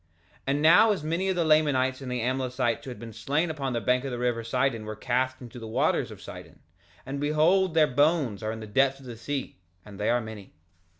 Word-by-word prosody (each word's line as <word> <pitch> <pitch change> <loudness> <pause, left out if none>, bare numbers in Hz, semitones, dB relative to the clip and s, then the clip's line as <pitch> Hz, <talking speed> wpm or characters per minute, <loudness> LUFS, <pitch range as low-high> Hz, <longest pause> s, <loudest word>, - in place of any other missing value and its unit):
3:3 85 - -40 0.4
And 140 +2 +1
now 180 +8 +7
as 195 -7 -2
many 170 +5 -1
of 190 - +1
the 170 -2 +1
Lamanites 145 -4 +2
and 130 -2 -6
the 125 -1 -2
Amlicites 125 -1 -1
who - - -6
had 125 - -7
been 115 +1 -9
slain 145 +9 -1
upon 135 -4 -3
the 120 - 0
bank 125 +2 +1
of 135 - -3
the 125 - -4
river 120 -1 -1
Sidon 120 -1 0
were 110 0 -5
cast 130 +3 -1
into 120 0 -10
the 115 - -8
waters 110 - +1
of - - -11
Sidon; - - -11 0.5
and 140 +1 -4
behold 160 +5 +2
their 155 -1 +6
bones 145 -5 +1
are 110 0 -2
in 110 0 -6
the - - -6
depths 135 +5 +2
of 135 - -15
the 120 -2 -7
sea, 135 0 -5 0.3
and 100 -1 -12
they 105 - 0
are 120 - +3
many. 110 -6 -9
130 Hz, 240 wpm, -27 LUFS, 115-150 Hz, 0.5 s, now